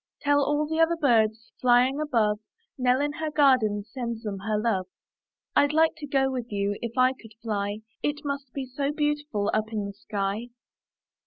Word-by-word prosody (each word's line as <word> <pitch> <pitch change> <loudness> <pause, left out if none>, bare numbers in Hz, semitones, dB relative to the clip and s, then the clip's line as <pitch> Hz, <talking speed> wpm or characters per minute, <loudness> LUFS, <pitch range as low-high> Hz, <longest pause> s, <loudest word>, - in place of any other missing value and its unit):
Tell 285 0 +3
all 295 +2 +1
the 320 +1 -2
other 330 +1 +4
birds, 230 -7 +2
Flying 250 +3 +4
above, 225 -8 +1 0.4
Nell, 255 0 +2
in 290 0 0
the 315 +1 -3
garden. 250 -8 +4
Sends 235 0 -5
them 200 -3 -4
her 210 +2 -1
love. 210 -4 0 0.7
rd 285 +1 +4
like 320 +1 +4
to 300 -1 -7
go 270 -1 +2
with 245 -3 -4
you 200 0 0
If 235 +1 -5
I 255 +1 +5
could 225 -5 -16
fly; 205 -2 -2 0.2
It 295 0 -2
must 280 -2 -4
be 270 0 -4
so 275 +3 -2
beautiful 295 -8 -1
Up 215 +1 0
in 210 -2 -2
the 200 - -6
sky! 200 +2 -3
250 Hz, 180 wpm, -26 LUFS, 215-290 Hz, 0.7 s, I